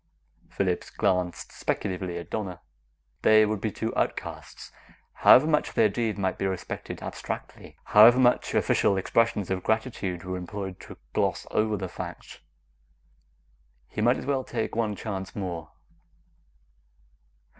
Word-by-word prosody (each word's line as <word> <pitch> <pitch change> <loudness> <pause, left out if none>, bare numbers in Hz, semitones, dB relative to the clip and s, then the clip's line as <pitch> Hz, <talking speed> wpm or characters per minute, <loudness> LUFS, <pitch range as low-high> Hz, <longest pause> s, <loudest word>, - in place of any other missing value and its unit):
Phillips 90 -3 -1
glanced 90 -4 -1
speculatively 90 -2 -3
at 85 - -8
Donna. 95 -5 -4 0.6
They 110 0 +6
would 105 -2 -2
be 110 - -1
two 110 +2 -4
outcasts, - - -4 0.4
however 130 - +7
much 155 -1 +1
their 110 - +4
deed 110 0 -2
might 95 -2 -1
be 95 - 0
respected 95 -1 -5
abstractly, - - -7
however 110 +4 +7
much 125 -1 +3
official 100 - +2
expressions 105 -1 +1
of 95 -1 -1
gratitude 110 -6 -2
were 95 0 -4
employed 95 +1 -6
to - - -11 0.2
gloss - - 0
over 110 -1 +1
the 95 -1 -4
fact. - - -8 1.5
He 105 - -4
might 120 +3 +4
as - - -7
well 135 -2 0
take 115 -3 -3
one 110 -2 0
chance 95 -3 -5
more. 85 -5 -4
105 Hz, 135 wpm, -27 LUFS, 95-110 Hz, 1.5 s, however